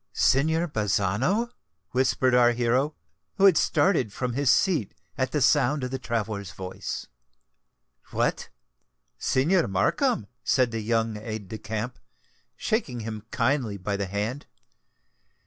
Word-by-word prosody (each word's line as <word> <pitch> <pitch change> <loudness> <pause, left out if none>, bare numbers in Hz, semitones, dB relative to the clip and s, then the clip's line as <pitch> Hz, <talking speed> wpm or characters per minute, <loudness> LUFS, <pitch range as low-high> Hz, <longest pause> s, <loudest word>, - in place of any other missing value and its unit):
"Signor 160 +5 +2
Bazzano," 110 - 0 0.4
whispered 130 0 +2
our 120 -1 +5
hero, 125 +5 +1 0.4
who 195 - +4
had 190 -4 +7
started 155 - +2
from 125 +3 -3
his 140 +1 +1
seat 155 - +2 0.2
at 130 -1 -1
the 150 - 0
sound 145 +1 +3
of 125 - -3
the 130 - -3
traveller's 105 -7 -3
voice. 95 +1 -6 1.0
"What! - - -1 0.7
Signor 165 +7 +2
Markham!" 105 - +1 0.2
said 130 -2 +2
the 115 -1 -3
young 115 0 0
aide 110 -2 -6
de 110 - -6
camp, 110 +4 -4 0.6
shaking 140 - -1
him 110 -1 -6
kindly 115 -4 0
by 100 +2 -2
the 100 -1 -2
hand. 105 +8 -3
120 Hz, 130 wpm, -26 LUFS, 105-145 Hz, 1.0 s, had